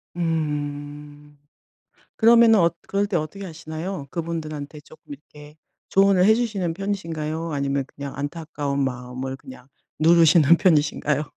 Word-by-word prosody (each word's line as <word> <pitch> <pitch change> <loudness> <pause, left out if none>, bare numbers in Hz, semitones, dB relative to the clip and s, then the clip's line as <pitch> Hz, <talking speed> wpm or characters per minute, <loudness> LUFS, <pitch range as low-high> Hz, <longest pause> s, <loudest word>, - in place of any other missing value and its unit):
음. 145 -2 -4 0.8
그러면은 230 -1 +6
엇 170 -1 +2
그럴 200 +1 0
때 195 - 0
어떻게 165 +6 -5
하시나요? 160 -1 -6
그분들한테 155 -3 -5
쪼끔 155 -1 -14
이렇게 150 +1 -15 0.3
조언을 195 -1 +4
해 220 - +6
주시는 210 -7 -1
편이신가요? 165 -4 -4
아니면 140 -1 -1
그냥 140 -1 -7
안타까운 145 -1 -3
마음을 130 +1 -4
그냥 260 - -13 0.3
누르시는 165 0 +5
편이신가요? 150 -4 +1
155 Hz, 320 characters per minute, -23 LUFS, 145-175 Hz, 0.8 s, 그러면은